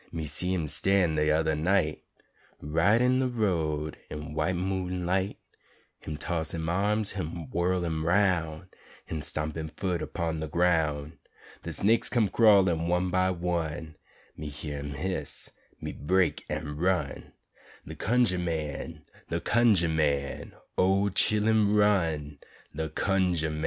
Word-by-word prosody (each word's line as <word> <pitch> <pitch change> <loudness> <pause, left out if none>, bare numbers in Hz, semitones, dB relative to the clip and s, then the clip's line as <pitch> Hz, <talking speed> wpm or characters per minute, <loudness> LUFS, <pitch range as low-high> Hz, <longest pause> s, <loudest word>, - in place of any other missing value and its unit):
Me 80 -2 -4
see 80 +5 0
him 85 -4 -1
stan' 95 +2 +2
de 75 0 +1
yudder 80 0 +2
night 80 0 +1 0.6
Right 90 +9 +2
een 125 +1 +3
de 130 - +2
road 80 -10 -1
een 75 0 -6
white 80 +4 0
moon 90 -1 -2
light; 95 +3 0 0.6
Him 75 - -6
toss 80 0 -2
him 80 0 -3
arms, 100 +3 +1
him 85 -4 -5
whirl 90 +1 0
him 80 -1 -2
'roun', 85 -2 +1 0.4
Him 80 - -4
stomp 75 0 -1
him 80 -1 -4
foot 90 +1 -3
urpon 80 -1 -3
de 80 - -3
groun'; 80 -2 0 0.4
De - - -6
snaiks 110 +4 +3
come 115 -5 +2
crawlin', 95 -7 +4
one 90 +1 +1
by 95 +1 +2
one, 85 -3 -2 0.4
Me 75 -1 -6
hyuh 75 0 -6
um 70 0 -5
hiss, 80 -1 -3 0.3
me - - -5
break 90 +5 0
an' 75 -1 -4
run 90 +2 -1 0.5
De - - -7
Cunjah 120 -6 +1
man, 80 -1 -4 0.3
de - - -1
Cunjah 110 -7 +3
man, 70 -3 -1 0.3
O 95 +2 +3
chillen, 105 +1 +3
run, 80 -9 +1 0.4
de 80 +1 -2
Cunjah 90 -2 0
man! 75 - -4
85 Hz, 145 wpm, -28 LUFS, 80-95 Hz, 0.6 s, crawlin